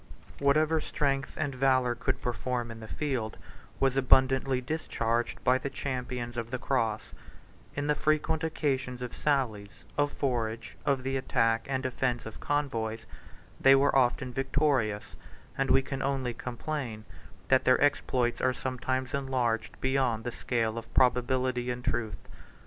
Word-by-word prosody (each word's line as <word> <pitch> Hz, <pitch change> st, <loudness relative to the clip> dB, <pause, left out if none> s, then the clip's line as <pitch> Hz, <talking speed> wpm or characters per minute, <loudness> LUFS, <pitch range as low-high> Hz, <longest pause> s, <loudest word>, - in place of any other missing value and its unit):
Whatever 155 Hz, +3 st, +3 dB
strength 140 Hz, -1 st, -1 dB
and 140 Hz, -, -1 dB
valor 130 Hz, -1 st, +3 dB
could 120 Hz, -, -2 dB
perform 120 Hz, -1 st, -2 dB
in 115 Hz, -, -9 dB
the 110 Hz, -, -9 dB
field 125 Hz, -7 st, -2 dB, 0.4 s
was 135 Hz, -1 st, +2 dB
abundantly 130 Hz, 0 st, +4 dB
discharged 120 Hz, -4 st, -2 dB
by 130 Hz, +1 st, +4 dB
the 140 Hz, -, -3 dB
champions 125 Hz, -3 st, -4 dB
of 115 Hz, -1 st, -3 dB
the 130 Hz, -, -2 dB
cross: 115 Hz, -5 st, -1 dB, 0.6 s
in 140 Hz, -, -1 dB
the 150 Hz, -, +3 dB
frequent 155 Hz, +1 st, +1 dB
occasions 135 Hz, -5 st, -1 dB
of 125 Hz, -, -5 dB
sallies, 115 Hz, -9 st, -1 dB, 0.2 s
of 145 Hz, 0 st, +3 dB
forage, 115 Hz, -4 st, -2 dB
of 135 Hz, -2 st, +2 dB
the 135 Hz, +1 st, -1 dB
attack 115 Hz, -3 st, +1 dB
and 130 Hz, -1 st, -1 dB
defence 125 Hz, -1 st, -1 dB
of 110 Hz, -, -8 dB
convoys, 115 Hz, -6 st, -1 dB, 0.5 s
they 135 Hz, 0 st, +7 dB
were 135 Hz, +1 st, +3 dB
often 125 Hz, 0 st, +2 dB
victorious; 135 Hz, -6 st, 0 dB, 0.4 s
and 135 Hz, 0 st, 0 dB
we 135 Hz, -, +5 dB
can 135 Hz, 0 st, -4 dB
only 135 Hz, -3 st, -1 dB
complain, 120 Hz, -2 st, -5 dB, 0.4 s
that 130 Hz, 0 st, +4 dB
their 130 Hz, -, +5 dB
exploits 125 Hz, -4 st, +1 dB
are 130 Hz, 0 st, +3 dB
sometimes 130 Hz, +1 st, -2 dB
enlarged 130 Hz, -5 st, -1 dB
beyond 130 Hz, -4 st, +1 dB
the 120 Hz, -, -3 dB
scale 115 Hz, -2 st, -1 dB
of 115 Hz, -, -13 dB
probability 125 Hz, 0 st, +2 dB
and 125 Hz, 0 st, -4 dB
truth. 110 Hz, -4 st, -2 dB
130 Hz, 145 wpm, -29 LUFS, 120-135 Hz, 0.6 s, they